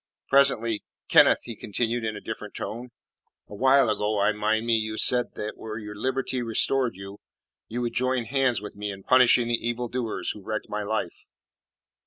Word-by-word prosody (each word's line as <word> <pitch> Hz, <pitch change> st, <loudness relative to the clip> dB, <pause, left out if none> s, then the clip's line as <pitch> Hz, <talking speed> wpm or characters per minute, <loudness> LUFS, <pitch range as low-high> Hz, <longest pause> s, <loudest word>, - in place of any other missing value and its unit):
Presently 115 Hz, -6 st, +3 dB, 0.3 s
"Kenneth," -, -, +6 dB
he 115 Hz, -, -7 dB
continued 115 Hz, +3 st, -2 dB
in 110 Hz, -1 st, -2 dB
a -, -, -6 dB
different 105 Hz, -1 st, -7 dB
tone, 115 Hz, +5 st, -5 dB, 0.6 s
"a -, -, -12 dB
while 135 Hz, +4 st, +4 dB
ago 105 Hz, 0 st, 0 dB
I 100 Hz, -, +3 dB
mind 110 Hz, +1 st, 0 dB
me 115 Hz, -1 st, +3 dB
you 110 Hz, 0 st, -2 dB
said 125 Hz, +1 st, +2 dB
that 105 Hz, 0 st, -5 dB
were 110 Hz, -1 st, -6 dB
your 105 Hz, -1 st, -7 dB
liberty 130 Hz, +3 st, -2 dB
restored 120 Hz, 0 st, +1 dB
you, 95 Hz, +1 st, -10 dB, 0.5 s
you 120 Hz, +2 st, -4 dB
would 120 Hz, -, -2 dB
join 130 Hz, -1 st, 0 dB
hands 130 Hz, -1 st, +1 dB
with 105 Hz, -, -8 dB
me 105 Hz, 0 st, -4 dB
in 95 Hz, -1 st, -8 dB
punishing 125 Hz, -1 st, +5 dB
the 120 Hz, -1 st, 0 dB
evildoers 120 Hz, -1 st, -2 dB
who 105 Hz, -, -10 dB
wrecked 110 Hz, +2 st, -4 dB
my 105 Hz, 0 st, -3 dB
life." 105 Hz, -4 st, -4 dB
110 Hz, 180 wpm, -26 LUFS, 105-125 Hz, 0.6 s, Kenneth